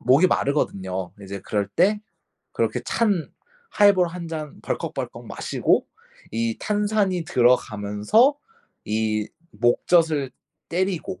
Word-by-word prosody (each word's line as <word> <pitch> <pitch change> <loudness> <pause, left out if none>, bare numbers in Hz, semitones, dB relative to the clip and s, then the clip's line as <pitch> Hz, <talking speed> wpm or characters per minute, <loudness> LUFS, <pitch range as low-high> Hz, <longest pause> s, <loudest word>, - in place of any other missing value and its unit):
목이 135 +9 +5
마르거든요. 95 - -1
이제 100 0 -7
그럴 100 0 -1
때 205 - +3 0.5
그렇게 - - -1
찬 205 -8 0 0.4
하이볼 200 -4 +5
1 170 -1 -7
잔 155 -3 -6
벌컥벌컥 - - -4
마시고 - - 0 0.5
이 115 0 -1
탄산이 205 -4 0
들어가면서 120 - +3 0.5
이 110 0 -1 0.2
목젖을 140 +5 +2 0.8
때리고 185 - -7
140 Hz, 230 characters per minute, -23 LUFS, -, 0.8 s, 목이